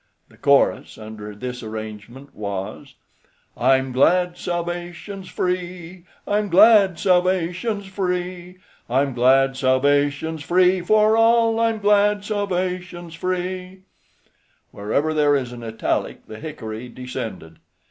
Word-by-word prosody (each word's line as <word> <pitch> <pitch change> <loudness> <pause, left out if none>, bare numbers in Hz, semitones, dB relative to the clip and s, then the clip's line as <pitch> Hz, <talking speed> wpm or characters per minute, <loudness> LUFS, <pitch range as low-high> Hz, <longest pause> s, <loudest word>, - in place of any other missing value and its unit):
The - - -21
chorus 140 -1 +2
under 110 -1 -9
this 125 +3 -6
arrangement 110 +5 -8
was: 100 -2 -6 0.6
I'm 130 +1 +2
glad 175 +7 +3
salvation's 175 +2 -5
free, 180 -1 -4 0.2
I'm 205 0 0
glad 200 -1 +6
salvation's 185 +3 0
free, 180 -1 -4 0.3
I'm 135 +2 +1
glad 135 +2 +3
salvation's 145 +4 +1
free 180 +4 +3
for 215 +4 +3
all, 230 0 +3
I'm 225 -1 +1
glad 205 0 +2
salvation's 180 -4 -3
free. 185 +2 -4 0.9
Wherever 140 +10 -1
there 145 -2 +3
is 125 -3 -2
an 120 - -9
italic, 110 -1 -3
the 110 - -10
hickory 125 -6 -7
descended. 115 -10 -7
175 Hz, 105 wpm, -22 LUFS, 130-185 Hz, 0.9 s, glad